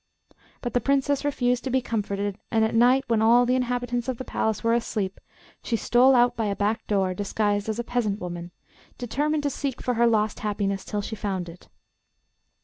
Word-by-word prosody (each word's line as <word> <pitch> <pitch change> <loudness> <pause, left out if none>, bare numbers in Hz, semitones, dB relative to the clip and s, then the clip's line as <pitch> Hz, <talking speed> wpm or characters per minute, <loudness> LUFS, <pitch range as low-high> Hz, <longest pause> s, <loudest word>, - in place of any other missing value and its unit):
But 240 - -4
the 245 - +2
Princess 280 +2 +1
refused 250 -4 0
to 265 - -3
be 260 +1 +2
comforted, 205 -4 -3
and 220 -1 +2
at 220 - -2
night, 250 +4 +4
when 230 -3 +2
all 235 +2 +5
the 250 - +1
inhabitants 245 -1 -1
of 260 -2 -2
the 260 - -5
palace 220 +1 -1
were 230 0 +3
asleep, 210 -5 -2 0.4
she 235 - -1
stole 250 +4 +4
out 245 0 +4
by 225 - -1
a 200 - -1
back 210 +3 -1
door, 190 -3 +1
disguised 205 +1 -1
as 220 - -2
a 240 - -2
peasant 225 -4 -1
woman, 175 -1 -6 0.5
determined 295 +5 -1
to 285 - 0
seek 270 -1 -3
for 250 - -1
her 235 0 +3
lost 215 -2 +1
happiness 200 -2 -2
till 205 -1 -3
she 220 - -5
found 190 -4 -3
it. 170 +1 -12
230 Hz, 200 wpm, -25 LUFS, 205-245 Hz, 0.5 s, all